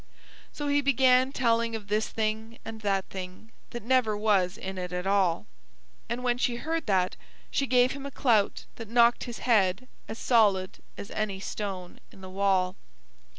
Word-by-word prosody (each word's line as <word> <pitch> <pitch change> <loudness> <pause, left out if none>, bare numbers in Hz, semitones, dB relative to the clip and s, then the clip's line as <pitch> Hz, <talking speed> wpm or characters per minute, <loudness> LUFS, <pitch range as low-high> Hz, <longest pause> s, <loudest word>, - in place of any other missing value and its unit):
So 290 - -5
he 285 0 +2
began 260 -1 +4
telling 230 -3 +1
of 210 -2 -7
this 215 +1 0
thing 220 +1 -3
and 225 -1 -7
that 195 -2 0
thing 185 +4 -8 0.2
that 240 - -7
never 235 -3 +2
was 205 -3 +2
in 190 0 -6
it 180 0 -5
at 180 +1 -3
all. 195 -4 +2 0.6
And 240 +2 -3
when 245 -1 +1
she 245 -1 +1
heard 320 +3 -3
that 185 -2 +1 0.4
she 275 - 0
gave 250 0 +4
him 280 0 -6
a - - -5
clout 230 -7 +1
that 225 -3 -8
knocked 235 0 +4
his 240 -2 -6
head 210 -1 +2 0.2
as 220 - -6
solid 205 -7 +2 0.2
as 200 - -8
any 205 -3 -2
stone 190 -3 -5
in 190 - -15
the 185 0 -9
wall. 190 -1 +1
220 Hz, 175 wpm, -28 LUFS, 195-245 Hz, 0.6 s, began